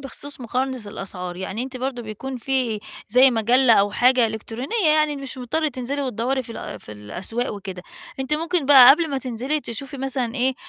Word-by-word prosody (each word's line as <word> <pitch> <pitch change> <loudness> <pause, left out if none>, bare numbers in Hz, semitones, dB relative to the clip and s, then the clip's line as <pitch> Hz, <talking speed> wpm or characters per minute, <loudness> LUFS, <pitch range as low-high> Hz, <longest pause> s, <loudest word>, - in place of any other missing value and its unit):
بخصوص 275 0 -7
مُقارنة 255 +1 -2
الأسعار، 180 -3 -5
يعني 190 +5 -4
أنتِ 260 0 -6
برضه 255 -1 -3
بيكون 230 +5 -6
في 245 -3 -1 0.3
زي 255 +4 +6
مجلة 240 +2 +4
أو 205 -1 +4
حاجة، 250 +1 +4
إلكترونية 240 - -3
يعني 305 -1 +2
مش 275 -1 -6
مُضطرة 305 +6 -1
تنزلي، 265 +2 -4
وتدوري 255 +1 -1
في 230 - -9
ال - - -7
في 105 - -10
الأسواق 185 - -4
وكده. 190 -2 -8 0.4
أنتِ 265 +3 0
مُمكن 330 -2 -1
بقى 265 -3 +10
قبل 320 +3 +4
ما 270 - -1
تنزلي 260 +4 -2
تشوفي 270 +3 -6
مثلًا 260 -3 -2
إيه، 260 0 +1
255 Hz, 180 wpm, -22 LUFS, 225-270 Hz, 0.4 s, بقى